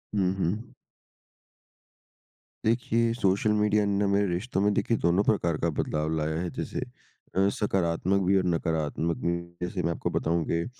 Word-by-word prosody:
हुँ, 95 -2 +2
हुँ। 100 +6 -2 1.9
देखिए 115 0 +2
social 100 -1 +2
media 105 0 +2
ना 100 0 +1
मेरे 100 +1 +2
रिश्तों 95 +4 -1
में 105 +1 +3
देखिए 115 +3 +1
दोनों 85 +4 +2
प्रकार 85 -8 +1
का 85 - 0
बदलाव 75 +1 -1
लाया 80 +1 -1
है 90 - -2
जैसे - - -4 0.6
अ, 95 +1 +4
सकारात्मक 95 -1 0
भी 95 +1 +4
और 95 - +2
नकारात्मक 80 -1 -1
भी। 85 0 +1 0.2
जैसे 90 +1 -2
मैं 85 - +1
आपको - - -2
बताऊँ 85 +1 0
कि 85 0 0
95 Hz, 155 wpm, -27 LUFS, 85-105 Hz, 1.9 s, अ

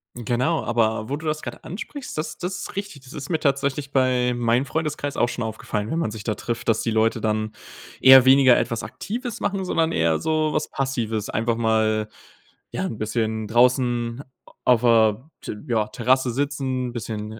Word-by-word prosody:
Genau. 120 +7 0
Aber 110 -2 +1
wo 140 - -1
du 155 +2 -8
das 155 0 -1
gerade - - -8
ansprichst, 255 - -7
das 155 - -4
das 185 +1 -4
ist - - -7
richtig. 195 -9 -6
Das 130 - -13
ist 145 -1 -7
mir 160 -3 0
tatsächlich 140 -1 0
bei 125 -2 +2
meinem 120 +2 +1
Freundeskreis 150 -2 -3
auch 120 - +2
schon 125 - -4
aufgefallen, 110 -1 -4
wenn 165 - -1
man 110 - -1
sich 105 -1 -8
da 110 - -1
trifft, 120 0 -4
dass 115 -2 +2
die 115 - -1
Leute 110 0 +1
dann 110 0 -1 0.5
eher 130 -1 +9
weniger 130 -1 +7
etwas 115 - -1
Aktives 235 +1 -5
machen, 195 -1 -1
sondern 165 -3 +1
eher 80 -1 +2
so 155 -1 0
was 155 - -1
Passives. 115 -6 -2
Einfach 115 +1 0
mal, 110 -1 +1 0.6
ja, 190 - -2
'n 110 - -4
bisschen 110 0 -2
draußen 120 +1 +2 0.4
auf 125 -3 +4
der 115 +2 +3
T - - -6
ja, 110 -3 +1
Terrasse 130 +2 +1
sitzen, 130 -1 -2
bisschen 110 -1 -5
125 Hz, 185 wpm, -23 LUFS, 110-140 Hz, 0.6 s, eher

